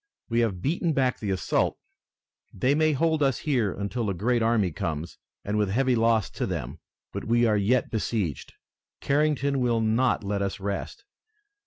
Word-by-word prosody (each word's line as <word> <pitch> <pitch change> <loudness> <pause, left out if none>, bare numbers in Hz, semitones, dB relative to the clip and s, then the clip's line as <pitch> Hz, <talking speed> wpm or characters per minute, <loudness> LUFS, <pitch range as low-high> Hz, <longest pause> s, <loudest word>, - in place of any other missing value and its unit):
"We 115 0 +1
have 100 -6 0
beaten 165 +2 0
back 130 -3 +1
the 105 - -4
assault. 95 -1 0 0.7
They 130 +8 +1
may 155 +1 +3
hold 160 +2 +1
us 135 -3 +2
here 125 -9 0
until 105 +2 -3
a 95 - -2
great 120 +6 +1
army 110 -5 +2
comes, 80 +1 -4 0.3
and 105 +1 0
with 105 -2 +1
heavy 130 +4 +2
loss 115 -3 +2
to - - -3
them, - - -4 0.3
but - - -5
we 120 +2 +3
are 110 -2 +3
yet 105 +5 +1
besieged. 105 - -2 0.5
Carrington 140 -1 +1
will 120 -2 +1
not 115 +2 +1
let 100 0 -2
us 100 0 -2
rest. 100 - -4
115 Hz, 170 wpm, -26 LUFS, 100-135 Hz, 0.7 s, may